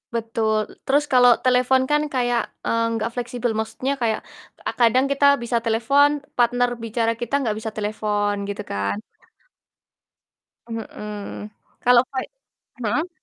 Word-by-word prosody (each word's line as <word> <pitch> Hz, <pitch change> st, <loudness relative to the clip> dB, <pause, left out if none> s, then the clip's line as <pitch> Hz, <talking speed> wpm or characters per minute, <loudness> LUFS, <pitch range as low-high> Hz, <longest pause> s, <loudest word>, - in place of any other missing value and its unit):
Betul, 220 Hz, -1 st, -1 dB
terus 285 Hz, +2 st, +3 dB
kalau 245 Hz, -1 st, +7 dB
telepon 255 Hz, +1 st, +3 dB
kan 295 Hz, 0 st, +4 dB
kayak, 245 Hz, -2 st, +1 dB, 0.2 s
eee, 230 Hz, 0 st, +1 dB
nggak 225 Hz, +1 st, -1 dB
fleksibel. 245 Hz, 0 st, -2 dB
Maksudnya 255 Hz, +5 st, -2 dB
kayak, 220 Hz, -2 st, +1 dB, 0.4 s
eee, -, -, -2 dB
kadang 250 Hz, +3 st, +4 dB
kita 280 Hz, 0 st, +2 dB, 0.2 s
bisa 235 Hz, 0 st, 0 dB
telepon, 240 Hz, +6 st, +4 dB, 0.3 s
partner 245 Hz, 0 st, +3 dB
bicara 230 Hz, 0 st, 0 dB
kita 240 Hz, +2 st, -5 dB
nggak 220 Hz, -4 st, 0 dB
bisa 220 Hz, 0 st, -5 dB
telepon 210 Hz, -1 st, -1 dB
gitu 205 Hz, 0 st, -4 dB
kan. 100 Hz, -, -1 dB, 1.7 s
Mhm. 210 Hz, -2 st, -7 dB, 0.3 s
Kalau 245 Hz, -1 st, +6 dB
voi 260 Hz, -1 st, -2 dB, 0.6 s
hmm? 290 Hz, -, -1 dB
235 Hz, 125 wpm, -22 LUFS, 215-250 Hz, 1.7 s, kalau